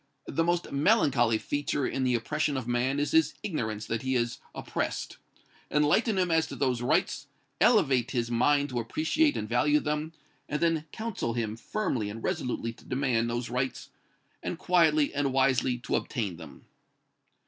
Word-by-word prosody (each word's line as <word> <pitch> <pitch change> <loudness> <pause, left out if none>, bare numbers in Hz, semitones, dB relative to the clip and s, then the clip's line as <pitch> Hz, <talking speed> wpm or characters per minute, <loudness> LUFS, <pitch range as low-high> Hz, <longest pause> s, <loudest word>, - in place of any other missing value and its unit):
"The 165 - 0
most 175 +1 0
melancholy 140 - +3
feature 145 +3 -2
in 135 - -1
the 125 -1 +2
oppression 145 +4 -1
of 130 -3 -4
man 125 +3 0
is 145 - 0
his 160 -1 +3
ignorance 110 - -3
that 115 -1 -2
he 130 0 -1
is 120 -1 -1 0.2
oppressed. - - -3 0.5
Enlighten 170 - +2
him 180 -2 +1
as 160 0 +3
to - - -7
those 130 -3 0
rights, 130 +3 0 0.3
elevate 135 - +4
his 120 -2 -1
mind 145 +4 +3
to 125 -2 -2
appreciate 160 - +1
and 105 - -3
value 145 +6 +3
them, 150 +2 -3 0.4
and 150 - -1
then 165 -2 +1
counsel 220 - -3
him 110 -2 -2
firmly 115 - -2
and 110 +2 -8
resolutely 115 -2 -2
to - - -19
demand 125 -3 0
those 120 0 -3
rights, 125 0 -3 0.5
and 175 - -4
quietly 160 -5 +3
and 140 -2 0
wisely 130 -2 +2
to 125 - -2
obtain 105 -9 -2
them." - - -12
135 Hz, 165 wpm, -28 LUFS, 120-155 Hz, 0.5 s, elevate